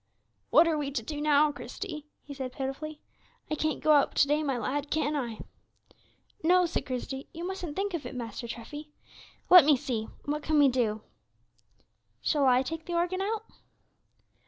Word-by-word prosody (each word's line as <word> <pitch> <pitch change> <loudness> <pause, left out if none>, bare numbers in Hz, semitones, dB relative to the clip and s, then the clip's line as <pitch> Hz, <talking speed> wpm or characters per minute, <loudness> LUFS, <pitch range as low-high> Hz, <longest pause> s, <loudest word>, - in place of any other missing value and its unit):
"What 335 - +6
are 315 -2 +1
we 285 -2 -2
to 270 -5 -3
do, 295 +5 -5
now, 300 0 +4
Christie?" 300 0 -7 0.2
he 285 - -9
said, 260 -2 -5
pitifully; 295 +4 -5 0.5
"I - - +2
can't 310 0 -1
go 310 - +4
out 290 -2 +4
to 280 - +4
day, 295 +2 +2
my 275 -4 -1
lad, 280 +5 -2
can 305 -1 0
I?" 240 -6 -3 1.0
"No," 360 +2 +5
said 340 - -3
Christie, 265 +1 -4
"you 335 +1 -5
mustn't 360 -5 -5
think 400 0 -2
of 330 -4 -3
it, - - -8
Master 235 0 -5
Treffy. 290 +6 -8 0.6
Let 360 -3 +11
me 290 -1 +5
see, 230 -3 -3 0.2
what 300 +1 -2
can 310 +1 +1
we 285 -2 +6
do? 220 -4 0 1.2
Shall 285 -3 +2
I 255 0 +4
take 320 +4 -5
the 345 - -2
organ 355 +2 0
out?" 435 +2 -2
295 Hz, 180 wpm, -29 LUFS, 265-320 Hz, 1.2 s, Let